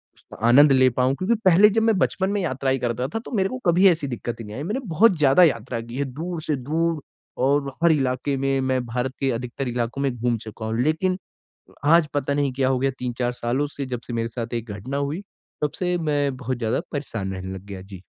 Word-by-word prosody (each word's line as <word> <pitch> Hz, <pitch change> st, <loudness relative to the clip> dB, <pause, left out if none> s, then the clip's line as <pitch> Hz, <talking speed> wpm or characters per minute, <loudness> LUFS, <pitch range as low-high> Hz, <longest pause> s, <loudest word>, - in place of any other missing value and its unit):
उसका -, -, -15 dB
आनंद 140 Hz, +4 st, +7 dB
ले 130 Hz, -1 st, +5 dB
पाऊँ? 130 Hz, +2 st, +1 dB
क्योंकि 205 Hz, +8 st, +1 dB
पहले 190 Hz, +4 st, +7 dB
जब 220 Hz, +2 st, +1 dB
मैं 225 Hz, -3 st, +3 dB
बचपन 190 Hz, +1 st, +1 dB
में 205 Hz, -1 st, 0 dB
यात्राएँ 135 Hz, -4 st, 0 dB
करता 125 Hz, +1 st, -1 dB
था -, -, +1 dB
तो -, -, -9 dB
मेरे 190 Hz, 0 st, +2 dB
को 255 Hz, -, -5 dB
कभी 180 Hz, +3 st, +6 dB
ऐसी 160 Hz, -5 st, 0 dB
दिक्कत 120 Hz, -1 st, -5 dB
ही 115 Hz, -, -7 dB
नहीं 105 Hz, +1 st, -8 dB
आई 140 Hz, -, -4 dB
मैंने 215 Hz, +10 st, -2 dB
बहुत 180 Hz, +3 st, +4 dB
ज़्यादा 150 Hz, +4 st, +5 dB
यात्रा 120 Hz, -5 st, +1 dB
की 115 Hz, +2 st, -8 dB
है 140 Hz, -, 0 dB
दूर 165 Hz, +2 st, -4 dB
से 150 Hz, -1 st, -1 dB
दूर 155 Hz, +4 st, -1 dB, 0.4 s
और 140 Hz, +1 st, +2 dB
हर 170 Hz, -, +6 dB
इलाके 135 Hz, -1 st, 0 dB
में 135 Hz, 0 st, +1 dB
मैं 130 Hz, -1 st, 0 dB
भारत 125 Hz, +3 st, -2 dB
के 135 Hz, -, +1 dB
अधिकतर 125 Hz, +3 st, -4 dB
इलाकों 120 Hz, +2 st, -2 dB
में 140 Hz, -, +1 dB
घूम 120 Hz, 0 st, 0 dB
चुका 110 Hz, 0 st, -8 dB
हूँ। 110 Hz, +1 st, -2 dB
लेकिन 170 Hz, +6 st, +1 dB, 0.7 s
आज 165 Hz, +1 st, +5 dB
पता 140 Hz, 0 st, 0 dB
नहीं 140 Hz, -2 st, 0 dB
क्या 130 Hz, -1 st, +1 dB
हो 130 Hz, -, +1 dB
गया 135 Hz, +1 st, +1 dB
3-4 125 Hz, 0 st, -2 dB
सालों 125 Hz, +4 st, -1 dB
से 140 Hz, -, -3 dB
जब 125 Hz, -2 st, -4 dB
से 120 Hz, -, -6 dB
मेरे 115 Hz, 0 st, -1 dB
साथ 120 Hz, 0 st, -5 dB
एक 115 Hz, -2 st, -4 dB
घटना 120 Hz, +8 st, -5 dB
हुई 140 Hz, +6 st, -2 dB, 0.4 s
तब 150 Hz, -, +1 dB
से 180 Hz, -1 st, 0 dB
मैं 145 Hz, -4 st, 0 dB
बहुत 130 Hz, -1 st, -3 dB
ज़्यादा 115 Hz, -2 st, 0 dB
परेशान 115 Hz, -10 st, -4 dB
रहने 95 Hz, 0 st, -6 dB
लग 95 Hz, -, -9 dB
गया। 95 Hz, -2 st, -7 dB
जी। 95 Hz, -1 st, -11 dB
135 Hz, 235 wpm, -23 LUFS, 120-155 Hz, 0.7 s, आनंद